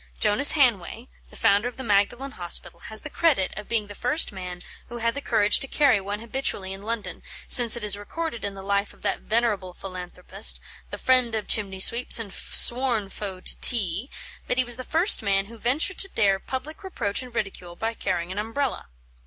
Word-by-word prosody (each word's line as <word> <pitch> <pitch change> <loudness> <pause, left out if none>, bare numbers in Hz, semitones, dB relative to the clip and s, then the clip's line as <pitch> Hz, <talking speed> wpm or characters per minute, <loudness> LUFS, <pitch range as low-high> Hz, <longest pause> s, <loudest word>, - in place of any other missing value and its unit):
Jonas - - +4
Hanway, - - 0 0.2
the - - -15
founder 200 +4 +2
of 245 - -8
the 260 - -7
Magdalen 230 +5 0
Hospital, 175 -3 -2
has 220 +4 -8
the 300 - -8
credit 290 - +1
of 210 0 -9
being 225 -3 0
the 205 - -11
first 275 +9 +2
man 180 -2 -8 0.3
who 240 - -7
had 230 0 -1
the 285 - -5
courage 215 -5 +2
to 270 - 0
carry 275 -8 +2
one 205 +2 -5
habitually 230 -6 -3
in 195 - -10
London, 220 +1 -5 0.3
since 240 -2 +6
it 235 - -6
is 210 -1 +1
recorded 235 +6 -6
in 200 -1 -4
the 195 - -10
life 200 +1 -1
of - - -23
that - - -2
venerable 210 -5 -1
philanthropist, 185 +1 0 0.3
the - - -7
friend 255 -3 +2
of 215 - -4
chimney 195 -3 0
sweeps 235 +5 +7
and 220 -4 -3
sworn 235 -5 +3
foe 190 -3 -7
to - - 0
tea, 210 - +1 0.4
that 250 - -1
he 255 - +4
was 240 -1 -4
the 255 - -7
first 330 +6 +3
man 195 -2 0
who 230 +3 -13
ventured 290 - -1
to 390 - +1
dare 195 - +1
public 295 - -7
reproach 210 - -3
and 250 -2 -12
ridicule 185 -5 -5
by 225 +5 -3
carrying 180 -5 -4
an 195 - -4
Umbrella. 230 - -4
220 Hz, 200 wpm, -24 LUFS, 195-250 Hz, 0.4 s, sweeps